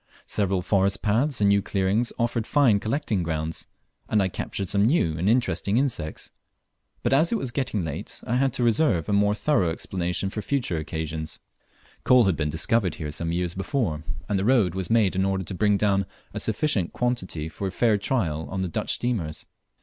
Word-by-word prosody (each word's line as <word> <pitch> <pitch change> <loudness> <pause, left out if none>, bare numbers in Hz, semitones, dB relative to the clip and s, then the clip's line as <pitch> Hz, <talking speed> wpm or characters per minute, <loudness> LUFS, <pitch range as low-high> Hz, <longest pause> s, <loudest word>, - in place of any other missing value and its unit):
Several 95 -3 0
forest 100 +1 +1
paths 120 +5 +1
and 100 - +5
new 100 0 +4
clearings 100 +4 0
offered 115 -1 -1
fine 130 -9 +4
collecting 110 -3 -1
grounds, 80 -1 -3 0.4
and 110 - +3
I 95 -1 +2
captured 95 +1 -3
some 100 +2 +2
new 110 - +2
and 90 +5 0
interesting 110 -4 +1
insects; 125 - -2 0.7
but - - +2
as 155 +5 +4
it 230 - +2
was 130 - -4
getting 120 - -1
late 80 - -6
I 120 - 0
had 135 0 +2
to 125 - -1
reserve 115 - +2
a 105 - 0
more 100 +1 +3
thorough 105 - +2
exploration 90 +3 -2
for 105 - -4
future 120 -9 -1
occasions. 80 0 -4 0.6
Coal 125 -1 +6
had 95 -5 +2
been 75 -1 -1
discovered 90 +4 +1
here 75 -3 -5
some 85 +2 -2
years 85 0 -1
before, 95 - -2 0.2
and 100 -2 0
the - - -1
road 110 -7 +3
was 95 -1 -3
made 110 -5 +3
in 95 - +2
order 95 0 0
to 95 - -5
bring 105 +2 +2
down 100 -2 +1 0.3
a - - -3
sufficient 105 - 0
quantity 95 -11 -2
for 90 +5 -5
a - - -3
fair 110 +1 +2
trial 80 - -1
on 95 +2 -2
the - - -1
Dutch - - -1
steamers. 100 -11 -2
100 Hz, 195 wpm, -25 LUFS, 85-120 Hz, 0.7 s, Coal